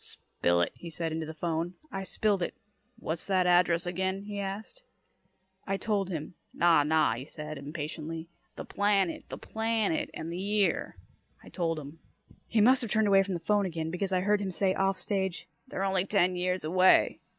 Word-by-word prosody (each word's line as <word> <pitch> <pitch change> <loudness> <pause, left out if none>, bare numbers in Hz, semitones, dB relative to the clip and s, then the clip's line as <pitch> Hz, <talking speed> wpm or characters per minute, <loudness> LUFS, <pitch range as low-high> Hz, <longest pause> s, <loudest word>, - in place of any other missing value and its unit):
"Spill 85 0 -1
it," 85 - +1
he 170 - -9
said 165 0 -3
into 160 0 -3
the 160 - -6
'phone. 170 +2 -2 0.2
I 195 - -3
spilled 200 0 0
it. 170 - -2 0.4
"What's 160 -7 -4
that 185 -2 +2
address 175 -1 +4
again?" 190 +2 -2
he 205 0 -5
asked. 200 - -5 0.9
I 195 0 0
told 200 -3 -1
him. 160 -2 -5 0.2
"Naw, 170 -3 +5
naw," 155 -4 +3
he 120 +3 -5
said 150 0 -7
impatiently. 155 +2 -5 0.3
"The - - -7
planet. 200 -3 +1
The - - -6
planet. 220 -5 -1
And 160 +1 -5
the 175 - -4
year." 205 0 0 0.5
I - - -12
told 165 -3 -1
him. 150 +2 -9 0.5
He 220 - +2
must 255 +5 +5
have 235 - -4
turned 215 +1 +2
away 195 -1 +6
from 195 -1 -2
the - - -3
'phone 205 +3 +2
again, 160 -2 -3
because 190 +2 -2
I 185 -1 +2
heard 205 +2 +2
him 195 - -2
say 190 +1 +1
off 195 0 +1
stage, 190 -1 -2 0.2
"They're 190 - -3
only 190 -1 +1
ten 185 -3 +2
years 180 0 -1
away." 185 +4 +4
185 Hz, 190 wpm, -29 LUFS, 165-200 Hz, 0.9 s, away